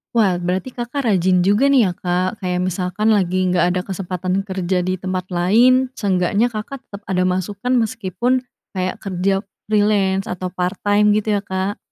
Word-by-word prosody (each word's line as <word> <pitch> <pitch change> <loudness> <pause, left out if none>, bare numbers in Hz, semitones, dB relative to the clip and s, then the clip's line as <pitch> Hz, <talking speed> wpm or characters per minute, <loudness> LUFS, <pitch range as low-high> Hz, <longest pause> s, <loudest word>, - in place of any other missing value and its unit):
Wah, 190 -6 +3
berarti 185 +8 -2
Kakak 245 +3 -4
rajin 185 -4 +3
juga, 210 +8 +4
nih, 265 -5 +5
ya, 185 - 0
Kak. 180 +4 -2
Kayak 180 -1 -1
misalkan 185 +4 0
lagi 185 -2 +1
nggak 180 -1 +2
ada 180 0 0
kesempatan 185 0 -2
kerja 190 -2 -1
di 185 +1 -1
tempat 185 0 -4
lain, 240 +9 +3
seenggaknya 200 +1 +1
Kakak 235 +4 -6
tetap 200 0 -11
ada 185 -1 0
masukan 200 +7 -1
meskipun, 230 +3 0 0.3
kayak 185 -1 -2
kerja 195 +1 -1 0.2
freelance 205 -2 +2
atau 185 0 -4
part 180 +1 -3
time 205 0 +3
gitu, 215 0 +1
ya, - - -3
Kak? 190 +2 -2
190 Hz, 165 wpm, -20 LUFS, 185-215 Hz, 0.3 s, nih